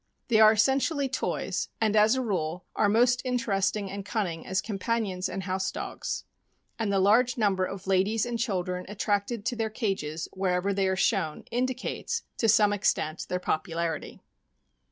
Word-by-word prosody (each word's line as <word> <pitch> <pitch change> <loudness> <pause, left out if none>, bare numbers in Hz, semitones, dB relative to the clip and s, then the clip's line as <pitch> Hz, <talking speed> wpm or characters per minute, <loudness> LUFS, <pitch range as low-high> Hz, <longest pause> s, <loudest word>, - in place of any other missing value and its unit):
They 220 -2 +4
are 215 0 +8
essentially 270 +5 +2
toys, 255 - -2
and, 220 -1 +2
as 215 +3 +5
a 260 - 0
rule, 180 -5 -2
are 205 - +3
most 245 +3 +3
interesting 210 -5 0
and 200 0 -5
cunning 190 -6 -3
as 190 - 0
compan 225 +2 -1
ions 185 -1 -3
and 195 - -4
house 190 0 -1
dogs; - - -4 0.6
and 220 -3 0
the 195 - +2
large 230 +6 +4
number 195 -4 +2
of 195 0 -7
ladies 195 +4 +2
and 240 -1 -3
children 180 -5 -1
attracted 205 +2 -1
to 245 - 0
their 225 -1 -1
cages 190 -9 -2
wherever 190 +1 0
they 195 -1 +1
are 190 - +1
shown 185 -5 0
indicates, 255 - -2 0.2
to 225 - +3
some 210 -1 +5
extent, 165 -5 0
their 180 - -1
popularity. 165 0 -2
205 Hz, 165 wpm, -28 LUFS, 185-230 Hz, 0.6 s, are